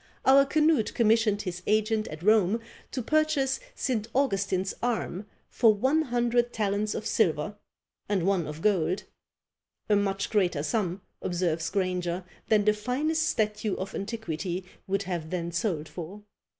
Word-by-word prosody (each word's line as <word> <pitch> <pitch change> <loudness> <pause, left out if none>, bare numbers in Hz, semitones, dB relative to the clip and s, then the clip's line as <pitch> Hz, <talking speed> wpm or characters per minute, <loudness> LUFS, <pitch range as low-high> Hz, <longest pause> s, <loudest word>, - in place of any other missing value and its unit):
Our 275 +1 +7
Canute 305 -6 +2
commissioned 220 -2 +3
his 180 -2 -5
agent 215 0 +2
at 155 +2 -8
Rome 215 +1 +4 0.3
to 255 - -4
purchase 305 -2 +1 0.2
St. 225 -5 -1
Augustin's 195 -7 +1
arm 220 -4 -2 0.2
for 225 -3 +4
one 265 +9 +2
hundred 240 -3 +1
talents 210 -1 -1
of - - -4
silver 175 -2 +1 0.5
and 190 -4 +1
one 190 -5 +1
of 150 +1 -7
gold; 185 -3 +2 0.9
a 210 - +5
much 200 -1 0
greater 180 -8 +1
sum, 185 +2 -1 0.2
observes 170 -2 -1
Granger, 180 -1 -1 0.3
than 210 -2 +4
the 210 - +5
finest 295 +9 0
statue 215 -2 0
of 190 +1 -5
antiquity 190 -4 -4 0.2
would 195 +1 0
have 175 -4 -4
then 170 -1 -3
sold 170 -3 -1
for. 185 +6 -8
205 Hz, 140 wpm, -28 LUFS, 180-230 Hz, 0.9 s, Our